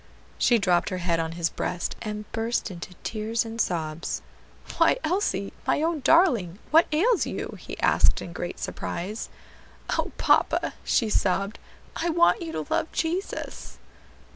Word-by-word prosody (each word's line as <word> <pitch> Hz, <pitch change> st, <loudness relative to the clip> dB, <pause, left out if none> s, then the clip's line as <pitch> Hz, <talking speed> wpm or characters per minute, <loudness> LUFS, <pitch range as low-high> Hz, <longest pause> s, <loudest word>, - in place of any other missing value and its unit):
She 240 Hz, -, +5 dB
dropped 180 Hz, -4 st, +2 dB
her 185 Hz, -, -3 dB
head 175 Hz, -2 st, 0 dB
on 165 Hz, 0 st, -2 dB
his 170 Hz, -1 st, -1 dB
breast, 175 Hz, -, -3 dB
and 210 Hz, -1 st, -4 dB
burst 225 Hz, -2 st, -1 dB
into 180 Hz, +1 st, -8 dB
tears 225 Hz, +1 st, -1 dB
and 225 Hz, 0 st, -2 dB
sobs. 160 Hz, -2 st, -2 dB, 0.6 s
"Why, -, -, +5 dB
Elsie, 310 Hz, -, 0 dB
my 300 Hz, -, +2 dB
own 330 Hz, -1 st, +1 dB
darling, 255 Hz, -, +4 dB
what 325 Hz, +2 st, +6 dB
ails 390 Hz, +8 st, +3 dB
you?" -, -, -4 dB
he -, -, -8 dB
asked -, -, +4 dB
in 170 Hz, -, -7 dB
great 175 Hz, 0 st, -4 dB
surprise. 200 Hz, +6 st, -4 dB, 0.7 s
"O -, -, -1 dB
papa!" -, -, +3 dB
she 230 Hz, -, +2 dB
sobbed, 195 Hz, +2 st, +1 dB, 0.4 s
"I 345 Hz, -, -1 dB
want 340 Hz, +2 st, +4 dB
you 330 Hz, -1 st, -4 dB
to -, -, -3 dB
love -, -, 0 dB
Jesus." 345 Hz, +4 st, -3 dB
215 Hz, 150 wpm, -26 LUFS, -, 0.7 s, what